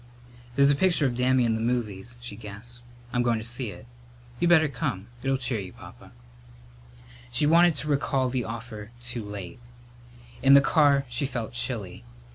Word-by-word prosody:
"There's 140 Hz, 0 st, +5 dB
a -, -, +3 dB
picture 170 Hz, -1 st, +2 dB
of 125 Hz, -3 st, 0 dB
Dammy 125 Hz, 0 st, +3 dB
in 115 Hz, -, +2 dB
the 110 Hz, -, -2 dB
movies," 115 Hz, -2 st, -2 dB
she 120 Hz, -3 st, -7 dB
gasped. 115 Hz, +3 st, -9 dB, 0.3 s
"I'm 125 Hz, -, +2 dB
goin' 120 Hz, -1 st, +2 dB
in 110 Hz, -, -4 dB
to -, -, -1 dB
see 120 Hz, 0 st, -3 dB
it. -, -, -11 dB, 0.5 s
You 175 Hz, -, +2 dB
better 160 Hz, -2 st, +6 dB
come. 115 Hz, -6 st, -4 dB
It'll 135 Hz, 0 st, +1 dB
cheer 125 Hz, -3 st, -1 dB
you, 95 Hz, -2 st, -7 dB
Papa." -, -, -14 dB, 1.2 s
She -, -, +1 dB
wanted 170 Hz, +1 st, +5 dB
to 150 Hz, -, -4 dB
recall 140 Hz, -2 st, +1 dB
the 125 Hz, -1 st, -1 dB
offer 115 Hz, -2 st, -7 dB
too 120 Hz, -1 st, -5 dB
late. 100 Hz, -3 st, -7 dB, 0.8 s
In 135 Hz, +1 st, +7 dB
the -, -, +10 dB
car 140 Hz, -1 st, +3 dB
she 125 Hz, +3 st, -2 dB
felt 120 Hz, -5 st, -5 dB
chilly. 120 Hz, -, -3 dB
120 Hz, 180 wpm, -26 LUFS, 110-140 Hz, 1.2 s, the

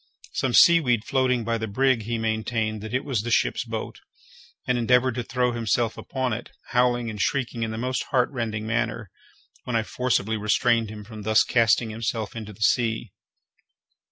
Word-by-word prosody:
Some 130 Hz, -2 st, 0 dB
seaweed 130 Hz, -10 st, +5 dB
floating 130 Hz, -3 st, +1 dB
by 115 Hz, +1 st, -1 dB
the 110 Hz, -, -3 dB
brig, 125 Hz, +1 st, +1 dB
he 115 Hz, +1 st, -2 dB
maintained 110 Hz, -1 st, -1 dB
that 110 Hz, -, -7 dB
it 130 Hz, +2 st, -1 dB
was 130 Hz, -7 st, -1 dB
the 120 Hz, -, -4 dB
ship's 115 Hz, -, +1 dB
boat, -, -, -6 dB, 0.7 s
and 125 Hz, -, +1 dB
endeavoured 125 Hz, +1 st, +3 dB
to 120 Hz, -, -3 dB
throw 125 Hz, +1 st, 0 dB
himself 115 Hz, 0 st, 0 dB
upon 130 Hz, -3 st, -3 dB
it, 120 Hz, +3 st, -6 dB, 0.2 s
howling 120 Hz, -2 st, +1 dB
and 105 Hz, -2 st, -5 dB
shrieking 120 Hz, -2 st, -1 dB
in 115 Hz, -, -1 dB
the 110 Hz, -, -5 dB
most 125 Hz, +2 st, -2 dB
heartrending 120 Hz, -5 st, -1 dB
manner, 110 Hz, -2 st, -2 dB, 0.5 s
when 125 Hz, -, -2 dB
I 115 Hz, -, +2 dB
forcibly 110 Hz, -2 st, -1 dB
restrained 115 Hz, +2 st, +2 dB
him 105 Hz, -1 st, -8 dB
from 110 Hz, 0 st, -10 dB
thus 110 Hz, +1 st, +4 dB
casting 115 Hz, -1 st, +2 dB
himself 110 Hz, -1 st, -3 dB
into 110 Hz, -2 st, -6 dB
the 105 Hz, -, -16 dB
sea. 110 Hz, -1 st, +1 dB
115 Hz, 175 wpm, -25 LUFS, 110-125 Hz, 0.7 s, seaweed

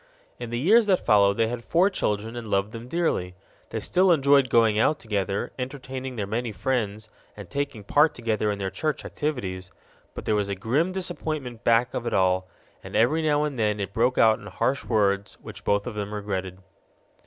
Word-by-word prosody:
In 120 Hz, -, -5 dB
the 120 Hz, -, -3 dB
years 210 Hz, -, +4 dB
that 190 Hz, -3 st, +2 dB
followed 100 Hz, -1 st, +4 dB
they 115 Hz, -, +3 dB
had 120 Hz, +1 st, -5 dB
four 175 Hz, +9 st, +3 dB
children 110 Hz, -, -2 dB
and 120 Hz, -2 st, -6 dB
loved 100 Hz, 0 st, 0 dB
them 115 Hz, +1 st, -8 dB
dearly. 125 Hz, -, -1 dB, 0.3 s
They -, -, -3 dB
still 185 Hz, 0 st, +3 dB
enjoyed 140 Hz, -4 st, +4 dB
going 115 Hz, -2 st, +4 dB
out 150 Hz, +7 st, +3 dB
together, 100 Hz, -4 st, -2 dB
entertaining 130 Hz, 0 st, -5 dB
their 105 Hz, -3 st, -2 dB
many 115 Hz, +3 st, -2 dB
friends, 110 Hz, 0 st, -2 dB, 0.3 s
and 100 Hz, -3 st, -9 dB
taking 140 Hz, 0 st, -4 dB
part 145 Hz, +9 st, +3 dB
together 110 Hz, -3 st, -1 dB
in 105 Hz, -, -1 dB
their 95 Hz, -1 st, -3 dB
church 155 Hz, +10 st, -2 dB
activities; 95 Hz, -, -4 dB, 0.4 s
but -, -, -7 dB
there -, -, +1 dB
was 105 Hz, -1 st, 0 dB
a 100 Hz, -, -1 dB
grim 130 Hz, -, 0 dB
disappointment 155 Hz, -10 st, -4 dB
back 115 Hz, +1 st, +3 dB
of 120 Hz, -, -3 dB
it -, -, -1 dB
all, 95 Hz, -1 st, +2 dB, 0.4 s
and -, -, -8 dB
every 145 Hz, +8 st, +3 dB
now 150 Hz, -1 st, +2 dB
and 145 Hz, -5 st, -3 dB
then 105 Hz, -1 st, +1 dB
it 100 Hz, 0 st, -4 dB
broke 125 Hz, +4 st, +1 dB
out 110 Hz, -1 st, +5 dB
in -, -, -11 dB
harsh 135 Hz, +1 st, -1 dB
words 100 Hz, -3 st, 0 dB
which -, -, -10 dB
both 100 Hz, 0 st, +1 dB
of -, -, -5 dB
them 105 Hz, 0 st, -4 dB
regretted. 95 Hz, -3 st, -4 dB
115 Hz, 200 wpm, -25 LUFS, 100-140 Hz, 0.4 s, out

